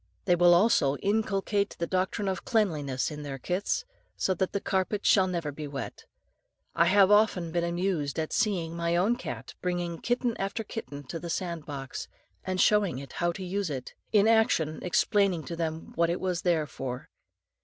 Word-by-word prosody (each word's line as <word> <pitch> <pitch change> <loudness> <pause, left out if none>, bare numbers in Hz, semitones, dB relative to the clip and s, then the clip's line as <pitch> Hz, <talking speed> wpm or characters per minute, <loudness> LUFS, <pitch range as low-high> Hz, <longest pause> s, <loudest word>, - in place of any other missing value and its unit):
They 180 - +4
will 175 0 +6
also 175 -8 +4
inculcate 200 -1 0
the 170 - -1
doctrine 185 +3 -1
of 190 -1 -2
cleanliness 155 - 0
in 150 0 -6
their 140 -2 -5
kits, 185 - -1 0.3
so 190 - +1
that 185 +1 -1
the 200 - -1
carpet 190 +2 -1
shall 190 -2 +5
never 170 -5 -2
be 150 +1 -6
wet. 140 -1 -6 0.7
I 170 - +4
have 195 +2 +5
often 205 -5 +3
been 170 +1 0
amused 170 -4 -1
at 160 -1 -2
seeing 170 -6 0
my 170 0 0
own 200 +7 +3
cat 250 - -7
bringing 175 -2 -2
kitten 245 -1 0
after 200 +4 -2
kitten 145 -10 -7
to 165 +5 -6
the 170 - -6
sand 170 -2 -3
box, 135 -3 -6 0.4
and 185 -1 -2
showing 205 -9 +3
it 135 0 -9
how 175 0 0
to 190 +2 -6
use 195 0 -2
it, 130 -4 -5 0.2
in 210 0 +5
action 220 -9 +3
explaining 185 -1 +2
to 170 - -5
them 160 -1 -4
what 170 0 +2
it 170 - -1
was 180 -2 -1
there 170 -4 +2
for. 130 -3 -6
175 Hz, 185 wpm, -28 LUFS, 160-200 Hz, 0.7 s, will